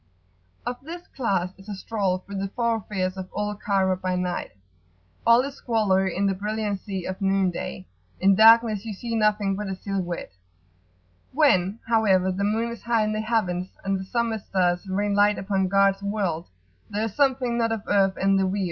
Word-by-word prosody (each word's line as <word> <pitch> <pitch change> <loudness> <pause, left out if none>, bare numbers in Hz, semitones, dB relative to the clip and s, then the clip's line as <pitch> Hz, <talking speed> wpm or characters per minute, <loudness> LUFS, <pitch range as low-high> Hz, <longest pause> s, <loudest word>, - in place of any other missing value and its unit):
Of 245 +1 -3
this 340 +5 -8
class 195 -8 0
is 195 +2 -13
a 205 - -4
stroll 195 -2 -1
through 200 +2 -8
the 195 0 -2
thoroughfares 205 -4 -2
of 185 -1 -6
old 210 0 -3
Cairo 190 -3 +2
by 185 0 -2
night. 180 -1 -2 0.8
All 235 +1 +7
is 275 +1 -5
squalor 210 -7 +1
in 190 +2 -1
the 195 - +2
brilliancy 205 -2 -3
of 185 +2 -5
noon 195 -1 +2
day. 185 +2 -6 0.3
In 195 +1 +5
darkness 220 0 +6
you 220 -3 -5
see 230 +3 -4
nothing 210 -2 +2
but 210 +1 -4
a 190 - -3
silhouette. 185 - -4 1.0
When, 225 - +3
however, 195 -5 +3
the 190 +2 -2
moon 225 +3 0
is 235 - -8
high 230 -2 +1
in 215 0 -1
the 215 - -1
heavens, 190 -5 -1 0.2
and 195 0 0
the - - -5
summer 230 +2 -1
stars 180 -2 0
rain 205 +2 0
light 205 +1 +4
upon 195 -1 0
God's 195 +1 +3
world, 200 -5 -2 0.4
there 210 +2 -2
is 225 -3 -3
something 255 -3 +1
not 230 -1 +1
of 225 -2 -2
earth 195 -1 +2
in 195 0 +3
the 190 -1 +2
view. 195 +2 -1
200 Hz, 185 wpm, -25 LUFS, 190-225 Hz, 1.0 s, All